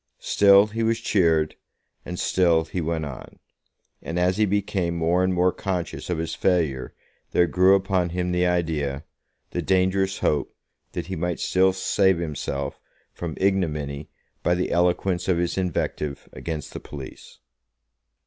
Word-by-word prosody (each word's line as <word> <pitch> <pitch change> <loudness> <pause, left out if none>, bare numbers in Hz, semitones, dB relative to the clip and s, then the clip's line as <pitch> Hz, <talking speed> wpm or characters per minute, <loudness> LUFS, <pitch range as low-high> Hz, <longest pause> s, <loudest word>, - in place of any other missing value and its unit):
Still 100 0 +5
he 110 +2 -4
was 115 0 +1
cheered, 80 -8 +2 0.5
and 90 - -6
still 85 -3 +3
he 90 +2 -3
went 80 -1 -2
on; 70 -3 -9 0.6
and 85 - -4
as 90 +2 +2
he 110 -1 +3
became 95 -3 0
more 85 +2 +2
and 95 - +2
more 90 0 +3
conscious 90 -4 -4
of 90 - 0
his 80 0 -3
failure 75 -9 0 0.4
there 90 - +5
grew 90 +4 +5
upon 95 -2 +1
him 90 +1 -2
the 90 0 +2
idea, 80 -5 -1 0.5
the - - -2
dangerous 95 +1 +1
hope, 75 - 0 0.4
that - - -3
he 95 +2 -5
might 90 +1 -2
still 95 +1 +3
save 95 0 +2
himself 75 -4 -4 0.3
from 85 -3 -6
ignominy 75 -7 -1 0.3
by 85 - +2
the 90 - -1
eloquence 90 +1 +1
of 90 -3 +2
his 85 0 -1
invective 75 -5 -2
against 80 -4 -5
the - - -5
police. 70 -3 -10
90 Hz, 150 wpm, -24 LUFS, 80-95 Hz, 0.6 s, Still